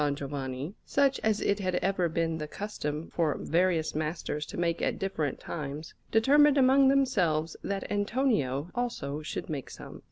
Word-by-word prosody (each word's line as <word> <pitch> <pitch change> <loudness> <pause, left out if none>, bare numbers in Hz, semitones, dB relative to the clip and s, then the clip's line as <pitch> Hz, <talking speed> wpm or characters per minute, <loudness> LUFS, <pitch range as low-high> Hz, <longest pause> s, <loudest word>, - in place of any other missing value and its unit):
Giovanni, 140 +2 -4
such 275 -1 +2
as 215 -1 +1
it 200 +1 +1
had 185 -2 -1
ever 185 -2 +1
been 165 0 -1
the 150 - -4
custom 155 -5 -5
for 160 -4 +1
various 170 -1 +1
masters 155 -1 -3
to - - -7
make 170 -1 0
at - - 0
different 160 -8 -2
times, 150 0 -6 0.2
determined 285 +6 +5
among 270 +1 +6
themselves 180 - +2
that 195 -1 -2
Antonio 205 - 0
also 155 - -3
should 150 - -5
make 145 -4 -5
some. - - -10
170 Hz, 155 wpm, -29 LUFS, 150-220 Hz, 0.2 s, among